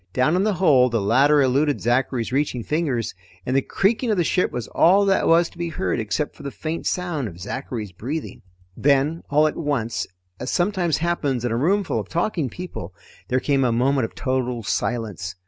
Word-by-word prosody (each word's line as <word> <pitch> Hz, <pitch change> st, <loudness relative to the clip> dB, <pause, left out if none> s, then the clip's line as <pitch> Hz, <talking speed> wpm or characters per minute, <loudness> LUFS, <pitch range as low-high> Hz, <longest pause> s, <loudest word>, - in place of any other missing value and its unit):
Down 130 Hz, +6 st, +2 dB
in 185 Hz, -, +2 dB
the 210 Hz, -2 st, +1 dB
hold 135 Hz, -9 st, +4 dB
the 115 Hz, -, +2 dB
ladder 135 Hz, +8 st, +4 dB
eluded 140 Hz, +3 st, +2 dB
Zachary's 120 Hz, 0 st, 0 dB
reaching 130 Hz, -3 st, 0 dB
fingers, 145 Hz, -7 st, -1 dB, 0.3 s
and 130 Hz, -, -1 dB
the 135 Hz, -, +4 dB
creaking 220 Hz, -, 0 dB
of 210 Hz, -, +1 dB
the 175 Hz, -, +3 dB
ship 180 Hz, +3 st, +1 dB
was 120 Hz, -, -4 dB
all 195 Hz, +4 st, +4 dB
that 195 Hz, -1 st, +2 dB
was 165 Hz, +1 st, +5 dB
to 170 Hz, -, -17 dB
be 170 Hz, 0 st, -2 dB
heard 95 Hz, -, -2 dB
except 110 Hz, +7 st, -2 dB
for -, -, -13 dB
the 140 Hz, -, -4 dB
faint 160 Hz, +4 st, -4 dB
sound 175 Hz, -8 st, -1 dB
of 85 Hz, -3 st, -10 dB
Zachary's 110 Hz, +1 st, -5 dB
breathing. 135 Hz, -, -5 dB, 0.3 s
Then 145 Hz, +4 st, +2 dB
all 150 Hz, +2 st, +4 dB
at 155 Hz, -, 0 dB
once, 130 Hz, -8 st, -2 dB, 0.3 s
as 125 Hz, -, -4 dB
sometimes 175 Hz, -3 st, +1 dB
happens 145 Hz, -7 st, -1 dB
in 120 Hz, -, -1 dB
a -, -, 0 dB
roomful 185 Hz, -, +1 dB
of -, -, -6 dB
talking 170 Hz, -5 st, -1 dB
people, 110 Hz, -, -8 dB, 0.3 s
there 130 Hz, -, +1 dB
came 135 Hz, 0 st, +1 dB
a 125 Hz, -, +2 dB
moment 130 Hz, +2 st, +2 dB
of -, -, -9 dB
total 125 Hz, -3 st, -2 dB
silence. 100 Hz, -5 st, -2 dB
140 Hz, 200 wpm, -23 LUFS, 120-165 Hz, 0.3 s, was